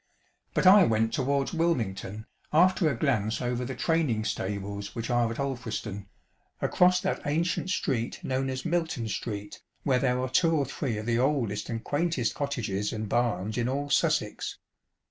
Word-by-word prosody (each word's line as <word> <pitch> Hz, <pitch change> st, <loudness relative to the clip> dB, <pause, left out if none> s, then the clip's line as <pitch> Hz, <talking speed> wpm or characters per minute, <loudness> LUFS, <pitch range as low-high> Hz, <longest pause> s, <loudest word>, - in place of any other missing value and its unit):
But -, -, +2 dB
I 195 Hz, +2 st, +9 dB
went 110 Hz, 0 st, +1 dB
towards 140 Hz, +2 st, 0 dB
Wilmington, 110 Hz, -, -1 dB, 0.3 s
after 175 Hz, 0 st, +4 dB
a 140 Hz, -, -1 dB
glance 110 Hz, -6 st, +1 dB
over 125 Hz, 0 st, -1 dB
the 130 Hz, +1 st, -4 dB
training 135 Hz, -8 st, +1 dB
stables 100 Hz, +1 st, -4 dB
which 115 Hz, +2 st, -3 dB
are 120 Hz, -1 st, +2 dB
at 115 Hz, -, -5 dB
Alfris 130 Hz, -5 st, -3 dB
ton, 100 Hz, -2 st, -7 dB, 0.5 s
across 180 Hz, 0 st, +4 dB
that 190 Hz, -, -1 dB
ancient 170 Hz, +5 st, 0 dB
street 125 Hz, -10 st, -1 dB
known 130 Hz, 0 st, -1 dB
as 130 Hz, +3 st, -4 dB
"Milton 165 Hz, -8 st, -1 dB
Street," 105 Hz, -1 st, -5 dB, 0.2 s
where 130 Hz, -3 st, +2 dB
there 125 Hz, -1 st, +1 dB
are 130 Hz, -, -1 dB
two 165 Hz, +4 st, +3 dB
or 145 Hz, -3 st, +1 dB
three 130 Hz, -3 st, -3 dB
of 110 Hz, -, -5 dB
the 120 Hz, 0 st, +1 dB
oldest 125 Hz, -7 st, 0 dB
and 115 Hz, -1 st, -3 dB
quaintest 145 Hz, -5 st, 0 dB
cottages 105 Hz, -8 st, -2 dB
and 110 Hz, -2 st, -4 dB
barns 110 Hz, -2 st, 0 dB
in 120 Hz, +1 st, 0 dB
all 140 Hz, +2 st, -2 dB
Sussex. -, -, +1 dB
125 Hz, 165 wpm, -28 LUFS, 110-145 Hz, 0.5 s, I